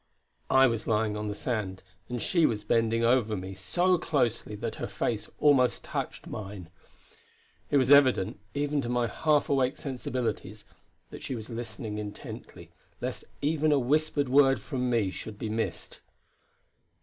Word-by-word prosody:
I 135 0 +6
was 115 -3 0
lying 110 -1 +1
on 105 0 -3
the 105 - -3
sand, 105 -7 -3 0.3
and 125 0 -3
she 170 +5 +3
was 105 -3 -2
bending 115 +1 +2
over 115 -3 +3
me 95 +1 -6
so 175 - +1
closely 125 -9 0
that - - -4
her - - -3
face - - -2
almost 135 -4 +3
touched - - -4
mine. 95 -5 -7 1.0
It 145 - +3
was 130 0 +3
evident, 130 -8 +5 0.2
even 145 0 0
to 120 - -4
my 120 -1 +1
half 150 +6 +1
awake 135 0 +1
sensibilities, 125 -6 -4 0.5
that - - -9
she 130 - -4
was 115 +1 -7
listening 110 -2 -5
intently, 105 -1 -8 0.3
lest - - -4 0.2
even 155 +1 +2
a 145 - +5
whispered 145 +2 +1
word 135 0 +5
from 125 -4 -2
me 115 -6 +1
should 105 +2 -7
be 110 - -4
missed. 110 +1 -3
120 Hz, 155 wpm, -28 LUFS, 105-140 Hz, 1.0 s, I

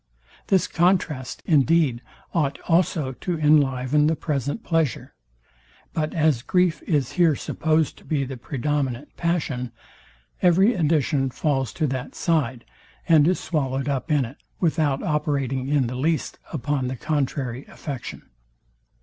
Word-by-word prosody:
This 190 -2 +3
contrast, 170 -7 0
indeed, 150 -5 +3 0.3
ought 150 -5 0
also 165 -5 +2
to 170 +6 -3
inliven 150 -1 +3
the 160 - +2
present 145 - -2
pleasure. 165 -6 -1 0.8
But 155 -1 -2
as 155 -6 +2
grief 180 +2 +1
is 145 -6 +1
here 170 -4 +3
supposed 155 +2 0
to - - -19
be 150 -4 -1
the 135 0 -5
predominant 140 +1 -3
passion, 145 -8 -1 0.7
every 190 +6 +5
addition 150 - +1
falls 135 -3 -1
to 155 - 0
that 130 -3 -4
side, 130 -8 0 0.4
and 160 -3 +6
is 180 - +2
swallowed 135 -4 -1
up 140 +3 -2
in 145 -4 +3
it, 125 +5 -10 0.2
without 155 -5 +1
operating 140 -4 -1
in 140 -2 +2
the 120 - -4
least 155 +5 -1
upon 145 -3 -1
the 130 - -3
contrary 135 -2 -2
affection. 140 -4 -7
150 Hz, 130 wpm, -24 LUFS, 130-160 Hz, 0.8 s, and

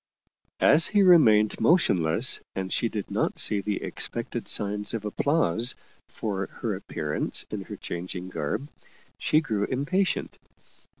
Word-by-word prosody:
As 155 +2 +5
he 205 -1 +3
remained 110 - +5
motionless 110 - +3 0.2
and 95 -1 -3
she 115 - 0
did 105 -3 -5
not - - -1
see 105 -2 +2
the 105 0 -3
expected - - -4
signs 105 +1 0
of 110 -2 -5
ap 105 - -5
plause 125 - +2 0.3
for 100 -3 -4
her - - -4
appearance 75 0 -2
in - - -5
her - - -8
changing 90 +1 -6
garb, 90 - -3 0.5
she 155 - +2
grew 110 -9 -1
impatient. 170 +9 -1
105 Hz, 135 wpm, -26 LUFS, 95-145 Hz, 0.5 s, As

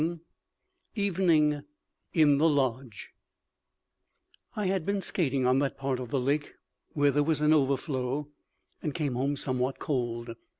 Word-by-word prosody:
VII 165 +2 -1 0.8
EVENING 170 -7 +2 0.5
IN 145 -4 +4
THE 165 +2 +5
LODGE 130 -6 -2 1.4
I 210 - -2
had 190 -2 0
been 200 +3 -1
skating 140 -9 0
on 130 +1 +4
that 140 -1 -1
part 135 -2 -2
of 125 -2 -6
the 135 - 0
lake 145 +4 -1 0.4
where 145 -1 +3
there 145 - +2
was 155 0 +1
an 150 +1 +4
overflow, 140 -1 0 0.5
and 150 -3 -3
came 145 -5 -1
home 135 +4 0
somewhat 130 -1 -1
cold. 120 -4 -3
145 Hz, 140 wpm, -28 LUFS, 130-155 Hz, 1.4 s, THE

